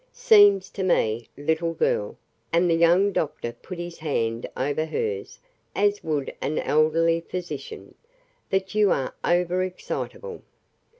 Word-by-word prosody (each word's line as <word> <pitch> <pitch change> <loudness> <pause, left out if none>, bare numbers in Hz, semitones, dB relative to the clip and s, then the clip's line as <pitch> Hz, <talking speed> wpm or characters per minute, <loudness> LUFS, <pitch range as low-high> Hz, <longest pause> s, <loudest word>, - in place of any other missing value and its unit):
"Seems 205 -3 +5
to 195 - -5
me, 115 -11 +1
little 160 +3 -1
girl," 105 -8 0 0.3
and 170 +1 +3
the 170 - +3
young 170 +4 +4
doctor 145 -9 -2
put 185 - -10
his 175 0 -7
hand 115 -7 -2
over 145 +4 0
hers 440 - -3 0.4
as 205 0 +1
would 150 -4 -2
an 155 - -2
elderly 165 +2 +2
physician, 185 - -7 0.6
"that 190 0 -1
you 210 -1 +4
are 135 -6 0
over 175 +1 +1
excitable. 435 - -5
170 Hz, 130 wpm, -25 LUFS, 155-195 Hz, 0.6 s, Seems